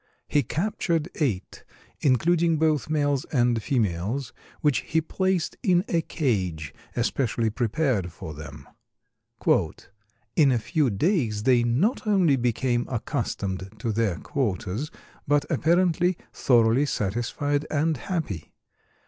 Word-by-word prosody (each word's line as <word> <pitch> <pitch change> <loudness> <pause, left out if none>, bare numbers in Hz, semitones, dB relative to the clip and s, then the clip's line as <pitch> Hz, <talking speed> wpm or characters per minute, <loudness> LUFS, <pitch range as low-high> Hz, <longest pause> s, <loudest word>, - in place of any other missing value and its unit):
He 145 - +3
captured 170 - -1
eight, 110 - -2 0.4
including 165 +5 +3
both 155 -2 +1
males 145 -3 +1
and 120 -4 +1
females, 110 +2 -1 0.3
which 145 -3 +3
he 160 - 0
placed 185 +2 -1
in 185 -4 +3
a 170 - +1
cage 90 - -2 0.2
especially 120 -2 0
prepared 115 - 0
for 80 -1 -8
them. 75 -1 -10 1.7
"In 145 -4 +5
a 125 - +3
few 140 +5 +1
days 115 - 0
they 125 0 +4
not 140 - +1
only 185 -9 +4
became 120 0 0
accustomed 105 - -3
to 115 +2 -2
their 105 -5 0
quarters, 115 - -2 0.4
but 145 0 +3
apparently 175 +1 +2 0.2
thoroughly 120 +3 +3
satisfied 125 +7 -1
and 155 +1 +1
happy. 115 - -4
130 Hz, 115 wpm, -25 LUFS, 110-160 Hz, 1.7 s, In